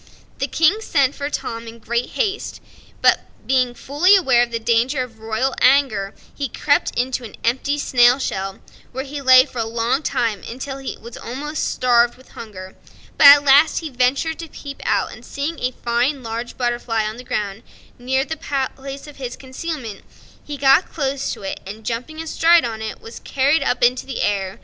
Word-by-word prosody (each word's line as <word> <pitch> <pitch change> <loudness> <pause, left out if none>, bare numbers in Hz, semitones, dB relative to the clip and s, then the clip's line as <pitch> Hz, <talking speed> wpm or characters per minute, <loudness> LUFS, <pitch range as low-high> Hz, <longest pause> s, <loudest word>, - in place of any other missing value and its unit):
The 275 - 0
King 330 +9 +2
sent 280 -9 +1
for 285 0 -4
Tom 230 -5 -5
in 230 +1 -10
great 235 +2 -3
haste, 425 -3 -2 0.4
but - - +5 0.3
being 255 -2 +1
fully 320 +11 +3
aware 265 -11 +4
of 245 - +1
the 230 - -2
danger 240 +4 +1
of 225 -3 -12
royal 225 +4 -1
anger, 250 -8 +3 0.2
he 280 -2 -4
crept 285 +5 0
into 250 0 -1
an 225 - -9
empty 265 +5 0
snail 245 -3 +4
shell, 195 -7 -4 0.3
where 260 +1 -3
he 285 +1 -6
lay 260 -1 +7
for 245 - -8
a - - +1
long 230 +4 0
time 235 -9 -1
until 270 +3 -6
he 270 - -6
was 235 0 -11
almost 295 +6 -4
starved 240 -1 +2
with 260 - -19
hunger; 190 -4 -10 0.4
at 285 0 +9
last 285 +4 +5
he 315 -3 -6
ventured 265 +6 0
to 330 - -6
peep 280 -2 -10
out, - - +1
and - - -12
seeing 290 +3 -4
a 250 - 0
fine 250 +3 -1
large 230 +1 -5
butterfly 240 -2 -1
on 215 +1 -4
the 250 - -9
ground, 205 -3 -3 0.4
near 265 +2 0
the 320 - -5 0.4
place 275 +1 -8
of 295 -1 -13
his 255 -2 -5
concealment, 260 -5 -6 0.4
he 295 -1 -6
got 275 +5 +4
close 275 -3 -2
to - - -7
it 195 - -4
and 210 +3 -9
jumping 250 +7 -4
astride 325 0 +3
on 220 -2 -5
it 220 -1 -5
was 230 - -10
carried 280 +4 +1
up 245 - 0
into 245 +2 +2
the, 265 - -3
air. 195 -2 -1
255 Hz, 190 wpm, -20 LUFS, 235-280 Hz, 0.4 s, at